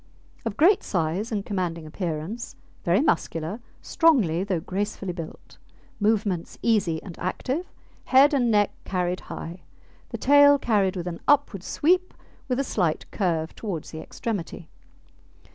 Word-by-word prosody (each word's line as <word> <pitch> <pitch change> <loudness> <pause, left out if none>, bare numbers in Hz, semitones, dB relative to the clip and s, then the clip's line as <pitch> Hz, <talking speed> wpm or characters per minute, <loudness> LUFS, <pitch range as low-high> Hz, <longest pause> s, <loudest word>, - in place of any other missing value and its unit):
Of 225 -3 -3
great 390 +6 +5
size 180 +6 -1
and 205 -3 -2
commanding 175 -5 -2
appearance, 170 +6 -4 0.3
very 175 +7 +3
muscular, 165 - -1 0.2
strongly 220 - +3
though 190 -4 -1
gracefully 195 +1 -3
built; 165 -2 -9 0.4
movements 205 -5 0
easy 195 -8 +1
and 180 -4 -10
active; 260 - -3 0.3
head 275 +3 +6
and 250 -4 +2
neck 205 -2 +3
carried 180 -1 -1
high; 170 +2 -8 0.5
the - - -4
tail 285 +1 +6
carried 205 -7 +1
with 175 -2 -4
an 170 -2 -5
upward 285 -10 +3
sweep, 360 - +1 0.3
with 255 0 0
a - - +2
slight 175 - -1
curve 165 -5 -1
towards 185 -8 -5
the 160 - -7
extremity. 190 -7 -5
195 Hz, 135 wpm, -25 LUFS, 170-240 Hz, 0.5 s, head